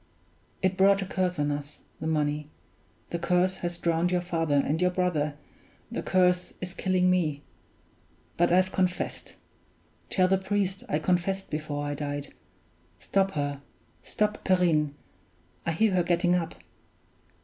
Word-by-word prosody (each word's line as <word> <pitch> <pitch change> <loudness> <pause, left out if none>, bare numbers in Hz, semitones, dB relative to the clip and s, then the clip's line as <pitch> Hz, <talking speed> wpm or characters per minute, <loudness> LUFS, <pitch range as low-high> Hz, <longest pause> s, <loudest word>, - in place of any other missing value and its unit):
It 190 0 +1
brought 195 +1 +5
a - - -5
curse 185 -1 -1
on 145 0 +1
us, 145 0 -6 0.2
the 160 - -3
money; 150 -1 0 0.6
the 170 - -2
curse 180 +2 +2
has 175 -1 -3
drowned 170 0 +1
your 180 0 +2
father 165 -4 0
and 145 +4 +1
your 180 - +4
brother; 175 -5 0 0.6
the - - -2
curse 180 -1 +2
is 180 0 -4
killing 185 -1 +1
me; 160 -6 +1 0.9
but 175 0 +3
I've 185 +1 +4
confessed 180 -1 -2 0.7
tell 185 -2 +3
the 190 0 +2
priest 195 0 -1
I 150 - +2
confessed 180 +4 0
before 150 -1 -3
I 145 - -2
died. 145 0 -4 0.6
Stop 195 - 0
her; 145 -1 -2 0.4
stop 210 0 -1
Perrine! 160 -6 +2 0.7
I - - +2
hear 210 +6 +2
her 180 - +3
getting 175 +1 +2
up. 170 -2 -1
175 Hz, 145 wpm, -28 LUFS, 150-185 Hz, 0.9 s, brought